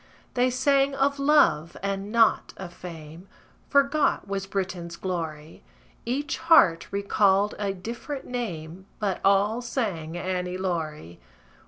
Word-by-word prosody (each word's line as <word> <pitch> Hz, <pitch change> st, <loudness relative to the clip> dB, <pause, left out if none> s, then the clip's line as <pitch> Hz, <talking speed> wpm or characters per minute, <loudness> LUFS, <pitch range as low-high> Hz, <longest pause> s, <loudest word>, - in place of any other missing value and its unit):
They 250 Hz, +1 st, +2 dB
sang 275 Hz, +2 st, +2 dB
of 280 Hz, +1 st, +1 dB
love, 225 Hz, -, +3 dB
and 200 Hz, +1 st, -3 dB
not 230 Hz, -1 st, +3 dB
of 180 Hz, -2 st, -8 dB
fame; 165 Hz, 0 st, -10 dB, 0.4 s
Forgot 280 Hz, -3 st, +2 dB
was 195 Hz, 0 st, -3 dB
Britain's 185 Hz, -3 st, -4 dB
glory: 165 Hz, -4 st, -5 dB, 0.5 s
Each 280 Hz, +4 st, -2 dB
heart 260 Hz, -, +5 dB
recalled 200 Hz, 0 st, +2 dB
a 200 Hz, -1 st, -1 dB
different 235 Hz, +9 st, -6 dB
name, 185 Hz, -7 st, -5 dB
But 200 Hz, -4 st, -2 dB
all 200 Hz, +4 st, +3 dB
sang 185 Hz, -, -3 dB
"Annie 180 Hz, 0 st, -3 dB
Laurie." 155 Hz, -, -4 dB
195 Hz, 120 wpm, -26 LUFS, 175-245 Hz, 0.5 s, heart